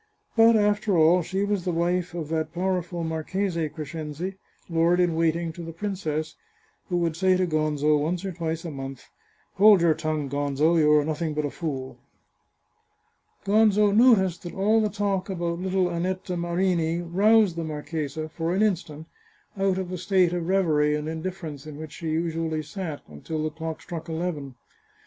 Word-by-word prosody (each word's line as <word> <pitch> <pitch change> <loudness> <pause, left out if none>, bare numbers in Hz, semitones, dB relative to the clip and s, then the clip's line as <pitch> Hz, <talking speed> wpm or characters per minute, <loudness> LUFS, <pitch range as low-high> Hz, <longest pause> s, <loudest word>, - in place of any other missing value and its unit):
But, 230 0 +6
after 210 -2 +2
all, 165 +3 +5
she 190 +4 -2
was 205 -3 -1
the 180 - -1
wife 175 +1 0
of 160 -3 -4
that 160 -1 -1
powerful 180 -1 -1
Marchese 165 +1 -2
Crescenzi, 155 +4 -5 0.3
lord 170 +1 +2
in 175 -2 +3
waiting 165 0 0
to 175 - -9
the 165 0 -6
prin 200 +4 -3
cess, 155 -3 -3 0.6
who 175 - 0
would 170 -2 0
say 185 +2 +3
to 185 - +2
Gonzo 155 -2 +1
once 175 +5 -2
or 190 - -2
twice 165 -1 -4
a 165 - -4
month, 135 -2 -7 0.3
" - - -38
Hold 205 -2 +7
your 170 -2 +4
tongue, 155 -2 -2
Gonzo, 145 +4 +1
you 150 -1 +4
are 150 -1 +4
nothing 155 0 -2
but 150 0 0
a 145 - -3
fool." 135 -6 -5 1.5
Gonzo 210 0 +4
noticed 205 -7 +4
that 175 - -8
all 215 +3 +3
the 215 - +1
talk 200 -2 -1
about 170 -2 -2
little 185 0 +1
Annetta 185 +1 -2
Marini 170 -1 0
roused 200 +2 +4
the 170 - -3
marchesa, 155 0 -4
for 165 +2 -2
an 205 - +3
instant, 160 -7 -1 0.5
out 195 -1 +1
of 190 -2 -3
the 185 - -4
state 185 -1 +2
of 175 -2 -2
reverie 155 -6 +2
and 150 0 -3
indifference 160 -3 -5
in 150 -1 -8
which 155 -1 -8
she 165 0 -5
usually 160 -1 -1
sat, 160 -1 -6
until 155 - -5
the 155 - -2
clock 160 0 -6
struck 165 -1 -7
eleven. 160 -5 -4
170 Hz, 175 wpm, -25 LUFS, 155-185 Hz, 1.5 s, Hold